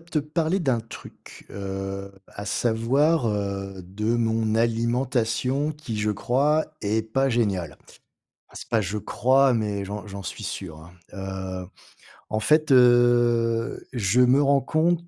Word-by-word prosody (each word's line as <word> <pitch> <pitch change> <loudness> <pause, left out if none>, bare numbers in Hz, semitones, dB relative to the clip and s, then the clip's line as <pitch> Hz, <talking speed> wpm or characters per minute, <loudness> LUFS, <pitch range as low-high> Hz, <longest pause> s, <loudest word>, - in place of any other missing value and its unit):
te 165 -1 -3
parler 155 +5 -1
d'un 130 -7 +1
truc, 115 - -13
heu, 95 0 -5 0.2
à 100 - -8
savoir, 120 +8 +1
heu, 100 -2 -3
de 105 +6 -2
mon 115 -2 0
alimentation 120 +4 0
qui, 135 -8 -6
je 105 0 0
crois, 140 +9 +1 0.2
est 105 +2 +1
pas 135 +5 0
géniale. 100 -7 -1 0.7
Enfin, - - -21
c'est - - -9
pas 110 - +2
je 105 +2 -3
crois, 130 +4 +3
mais 105 -3 -1
j'en 100 +1 -6
j'en 100 -1 -8
suis 90 - -7
sûr, 85 -5 -6
hein. 80 +3 -14 0.2
Heu, 95 -1 -5 0.6
en 110 - -1
fait 155 +5 +3
heu, 120 -1 +3
je 115 -1 +1
me 125 +3 +5
rends 140 -1 +3
compte 170 +4 0
115 Hz, 145 wpm, -24 LUFS, 100-135 Hz, 0.7 s, me